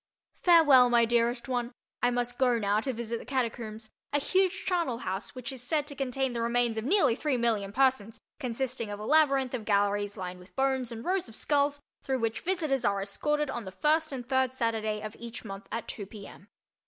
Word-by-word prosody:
Farewell, 295 -8 +7
my 235 -1 +5
dearest 235 +2 +1
one—I 245 -1 -2
must 245 0 -2
go 250 -2 +3
now 205 -1 +1
to 260 +4 -2
visit 235 -1 -4
the - - -11
Catacombs, 225 -4 -3 0.2
a 290 - +2
huge 375 +5 +1
charnelhouse 245 - -2
which 255 +2 -5
is 260 -2 -8
said 295 +3 0
to 290 -1 -8
contain 265 -1 -1
the 235 - -2
remains 235 0 +2
of 220 - -6
nearly 340 - +4
three 285 -1 0
million 220 -4 0
persons, 230 -3 +1 0.2
consisting 250 -3 -3
of 205 0 -5
a 210 - -6
labyrinth 275 -3 +3
of 245 -4 -3
galleries 205 0 +1
lined 180 -1 -5
with 180 +2 -17
bones 265 -2 0
and 230 0 -7
rows 365 -7 0
of 220 - -10
skulls 285 +1 +1 0.2
through 265 -1 -1
which 225 -2 -2
visitors 315 -8 0
are 200 -3 +1
escorted 295 +8 -1
on 235 - -4
the 190 - -7
first 310 - +1
and 250 -3 -6
third 260 -1 +1
Saturday 220 -3 -1
of 215 0 -6
each 235 0 -8
month 195 -1 -8
at 230 - -4
2 200 -3 -6
P. 200 -1 -10
M. 195 - -14
245 Hz, 205 wpm, -29 LUFS, 220-270 Hz, 0.2 s, Farewell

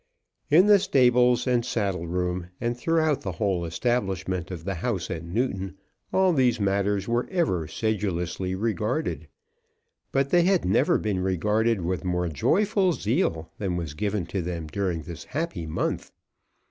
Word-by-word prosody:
In 165 +5 +6
the 205 -1 +7
stables 125 - +4
and 125 -2 +2
saddle 100 -8 -2
room, 90 0 -2
and 120 0 -1
throughout 155 +2 +1
the 95 - -4
whole 90 -1 0
establishment 95 -2 -1
of 90 -3 -6
the 100 +2 -2
house 95 -2 -2
at 80 - -4
Newton, 95 0 -2 0.3
all 190 -1 +3
these 125 -5 +2
matters 100 0 0
were 120 +1 0
ever 155 - 0
sedulously 95 -4 -2
regarded; 110 - -2 0.8
but 135 0 +1
they 175 - +5
had 185 +1 +2
never 130 - +3
been 105 -4 -1
regarded 105 +4 +1
with 90 +2 -2
more 90 -1 0
joyful 190 - +2
zeal 100 - -1
than 95 -4 -1
was 80 -4 -4
given 100 +2 -2
to 95 +2 -3
them 85 -1 -4
during 85 0 -2
this 85 +2 -8
happy 145 - -3
month. 80 - -2
100 Hz, 150 wpm, -26 LUFS, 90-125 Hz, 0.8 s, the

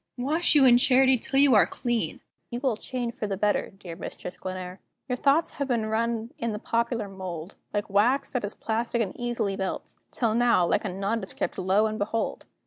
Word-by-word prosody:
wash 305 +7 +1
you 280 -2 +7
in 245 -1 +7
Charity 260 +1 +5
till 265 +3 -2
you 280 -2 +6
are 210 - +6
clean; 240 -2 -2 0.3
You 240 - -4
will 260 -4 +1
change 240 +1 -4
for 210 - -4
the 195 -1 -2
better, 205 +1 +1
dear 185 -3 -10
Mistress 180 - -7
Glenare. 185 0 -6 0.3
Your 250 - 0
thoughts 280 +5 +2
have 280 - +1
been 235 -4 0
run 230 +1 -1
in 230 -2 -1
the - - -3
popular 230 0 -1
mould, 185 -2 -7 0.2
Like 205 -1 -2
wax 235 +8 +2
that 250 - -2
is 205 - -4
plastic 230 +1 -1
and 190 - -6
easily 240 -5 -1
melts; 190 -1 -4
Till 230 -3 0
now, 235 -6 +4
like 210 - +1
a - - -1
nondescript, 195 +2 -2
lo, 190 +3 +3
and 215 0 -2
behold! 220 +2 -2
225 Hz, 200 wpm, -27 LUFS, 200-245 Hz, 0.3 s, you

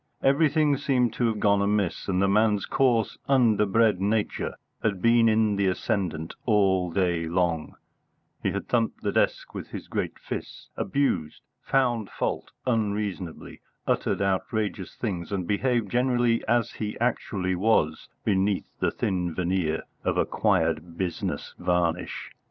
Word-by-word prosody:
Everything 145 +1 +3
seemed 125 -4 +1
to 120 - +1
have 110 -2 -1
gone 100 -1 +3
amiss, 100 -3 0
and 95 -2 +1
the 100 - +3
man's 105 +1 +3
coarse, 120 -5 +1
underbred 110 -5 +3
nature 105 +1 0 0.3
had 100 -4 0
been 115 +2 +5
in 110 -2 +2
the 100 -1 +2
ascendant 90 -3 -1
all 95 -5 +3
day 85 -2 0
long: 85 -2 0 0.7
he - - +1
had - - -4
thumped 115 -2 0
the - - 0
desk - - 0
with - - -6
his - - -8
great - - -3
fists, - - -7
abused, 140 - -1 0.2
found 120 -6 +1
fault - - -3 0.2
unreasonably, 105 -7 -2 0.2
uttered - - 0
outrageous 100 0 -1
things, 95 -6 -4
and 95 -3 -1
behaved 115 0 0
generally 120 -1 +2
as 120 -1 +2
he 105 -1 -5
actually 100 -6 0
was 90 -5 +1 0.2
beneath 100 0 +1
the - - +2
thin 90 -3 -2
veneer 90 -3 0 0.2
of - - 0
acquired 85 -4 +1
business 90 -2 -3
varnish. 90 -1 -1
105 Hz, 135 wpm, -26 LUFS, 90-115 Hz, 0.7 s, been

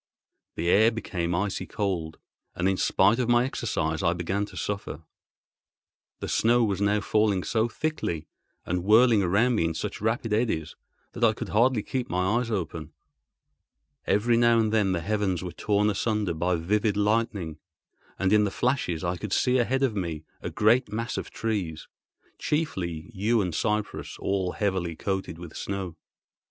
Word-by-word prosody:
The 85 - -2
air 110 +5 +6
became 90 -7 -3
icy 100 +2 -2
cold, 90 -7 -2 0.4
and 90 +1 0
in 95 - +2
spite 100 +5 +3
of 120 -2 0
my 120 +1 +4
exercise 80 - -2
I 85 -2 +2
began 95 +4 -1
to - - -12
suffer. 100 -6 -4 1.2
The - - -3
snow 120 +1 +3
was 100 -3 0
now 105 +1 +2
falling 105 -2 +1
so 110 0 +1
thickly 110 - -3 0.4
and 90 0 -1
whirling 110 +2 +5
around 100 +7 +3
me 95 -8 +1
in 85 - 0
such - - -4
rapid 110 0 0
eddies 105 -9 0 0.4
that 120 - -5
I 110 -1 +5
could - - -6
hardly 115 +1 +3
keep 130 -2 -3
my 90 +6 +1
eyes 125 -2 -3
open. 80 -6 -4 1.1
Every 115 +4 +3
now 120 0 +5
and 110 -1 +1
then 105 -4 +3
the 85 - -1
heavens 95 -2 -1
were 90 - -5
torn 105 +4 +1
asunder 105 -2 0
by 90 +3 0
vivid 105 +5 0
lightning, 105 -6 0 0.6
and 95 +1 +1
in 105 0 +5
the 105 - +1
flashes 95 - -1
I 90 0 -1
could 105 +2 -6
see 125 +5 +2
ahead 130 +3 +1
of 125 -5 +1
me 85 -5 -3 0.2
a - - -4
great 115 +4 +3
mass 115 +2 -3
of - - -4
trees, 95 -9 -3 0.5
chiefly 95 - -2
yew 110 +4 +1
and 90 -5 -1
cypress 105 +4 -2
all 95 -2 -1
heavily 95 -5 -1
coated 95 -2 -3
with 85 -2 -10
snow. 95 -4 -4
100 Hz, 170 wpm, -26 LUFS, 90-115 Hz, 1.2 s, air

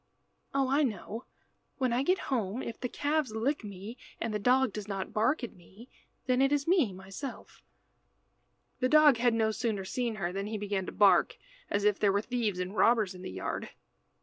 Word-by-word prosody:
Oh, 270 -1 +1
I 275 +3 +3
know. 225 -2 -3 0.5
When 255 -3 +1
I 245 - +2
get 365 +7 +2 0.2
home, 225 0 -1
if 230 - -6
the 250 - -3
calves 290 -4 -1
lick 260 +5 0
me, 205 +4 -8 0.2
and 225 -1 -2
the 210 - -1
dog 250 +1 +3
does 210 -1 -6
not 195 +1 -4
bark 245 +6 +1
at 240 - -5
me, 195 +8 -16 0.4
then 255 0 +2
it 275 +1 +3
is 290 0 +1
me 335 - +3
myself." 190 +8 -8 1.2
The 255 - +1
dog 300 -3 +7
had 240 0 +2
no 220 -1 +2
sooner 215 -4 -2
seen 240 +2 -2
her 180 -3 -3
than 195 +1 -3
he 215 0 -3
began 200 -2 -2
to - - -4
bark, 195 -4 +4 0.3
as 205 - 0
if 210 -1 +3
there 205 -2 +4
were 200 +1 +1
thieves 225 -4 -1
and 185 +2 -4
robbers 220 -5 +3
in 180 - -11
the - - -6
yard. 95 +1 -4
225 Hz, 200 wpm, -30 LUFS, 200-255 Hz, 1.2 s, dog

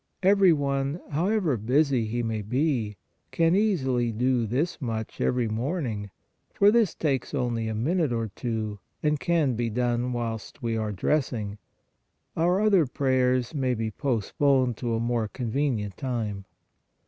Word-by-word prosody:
Every 195 -1 +6
one, 140 0 0
however 175 - +1
busy 125 +1 +2
he 120 +2 -2
may 110 -1 -2
be, 120 -2 -1 0.3
can 165 +1 +2
easily 135 - +1
do 120 +1 +1
this 145 - -1
much 110 -4 -4
every 125 -2 +1
morn 135 +10 -2
ing, 105 -3 -4 0.5
for 200 +1 +6
this 225 -6 +3
takes 135 -6 -1
only 115 -2 -1
a 110 - -2
minute 155 +6 +1
or 115 -2 -1
two 110 -1 -4 0.2
and 150 -1 +2
can 165 -7 +2
be 115 0 -1
done 120 +2 0
whilst 115 -3 -4
we 115 -1 0
are 110 -1 -1
dressing; 105 - -1 0.8
our 175 +3 +2
other 195 -8 +4
prayers 130 -1 +1
may 130 -4 0
be 110 -1 -2
postponed 130 +1 +1
to 115 -2 -1
a - - -1
more 115 -1 0
convenient 115 -4 -2
time. 110 -7 -3
125 Hz, 150 wpm, -26 LUFS, 115-150 Hz, 0.8 s, Every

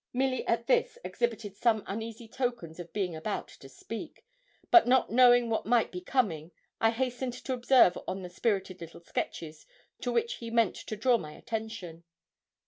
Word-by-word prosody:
Milly 255 0 0
at 235 0 +1
this 485 0 +2
exhibited 225 - -2
some 220 -1 +2
uneasy 225 +2 -6
tokens 240 -10 -3
of 175 -1 -8
being 185 -5 -2
about 160 +6 -4
to 135 - -14
speak, 225 +10 -8 0.5
but 350 -8 +8
not 260 +1 +3
knowing 245 0 +6
what 225 -2 -1
might 235 -1 +3
be 180 - -6
coming, 180 - 0 0.3
I 225 - +4
hastened 250 +1 -2
to 255 +1 -4
observe 245 -6 +4
on 190 0 -4
the 180 - -6
spirited 190 -2 -1
little 165 0 -10
sketches 160 -2 -5 0.3
to - - -1
which 465 +1 0
he 230 - -7
meant 230 -4 +2
to 215 - -6
draw 235 +3 +3
my 150 -4 -8
attention. 220 -7 -6
225 Hz, 170 wpm, -29 LUFS, 185-245 Hz, 0.5 s, but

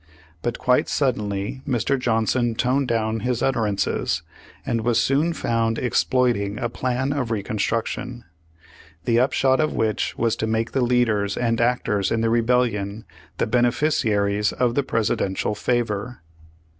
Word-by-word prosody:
But 120 +3 -2
quite 125 0 +2
suddenly 105 -3 -1
Mr. 130 +1 0
Johnson 115 0 +1
toned 130 +3 +1
down 110 -1 0
his 125 +2 -1
utterances, 110 -7 0 0.4
and 115 - 0
was 120 0 +2
soon 140 +7 +2
found 115 -6 0
exploiting 120 -5 +1
a 120 - -2
plan 130 +3 -1
of 135 -5 -2
Reconstruction, 115 +3 -2 0.8
the 115 0 +3
upshot 130 +1 +2
of 155 -1 +1
which 110 -1 -1
was 115 -1 +1
to 110 - -1
make 115 +1 -1
the 135 - 0
leaders 115 -5 +1
and 115 -1 0
actors 115 -5 +1
in 115 - 0
the 115 0 +1
Rebellion 115 -3 0 0.3
the - - +1
beneficiaries 110 -4 +1
of 125 -2 0
the 140 - +2
Presidential 105 -5 -1
favor. 115 -2 -2
115 Hz, 135 wpm, -23 LUFS, 110-125 Hz, 0.8 s, the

